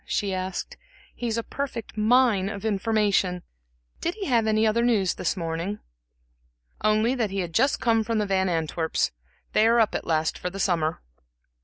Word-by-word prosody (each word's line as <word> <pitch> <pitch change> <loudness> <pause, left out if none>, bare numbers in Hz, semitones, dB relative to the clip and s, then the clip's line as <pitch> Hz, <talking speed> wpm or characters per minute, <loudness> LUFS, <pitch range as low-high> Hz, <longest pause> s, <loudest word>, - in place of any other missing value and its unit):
she 200 -2 -1
asked. 185 0 -4 0.4
"He's 235 -2 -3
a 230 - -1
perfect 260 -6 -5
mine 215 -3 +3
of 200 0 -6
information. 205 -4 +1 0.6
Did 345 - -2
he 415 -3 -5
have 235 -6 +2
any 215 0 +3
other 220 +2 +2
news 220 -6 +2
this - - -2
morning?" 170 +4 -3 1.1
"Only 215 +3 +3
that 235 -5 -1
he 195 0 -2
had 170 -2 -5
just 270 - +2
come 225 -2 +2
from 230 +1 -1
the 210 - +1
Van 190 -1 +1
Antwerps' 160 -1 0 0.4
they 215 - +4
are 235 +1 +4
up 220 - +3
at - - -4
last 160 -1 0
for 180 - -3
the 195 +2 -8
summer." 165 -5 0
210 Hz, 175 wpm, -25 LUFS, 185-230 Hz, 1.1 s, they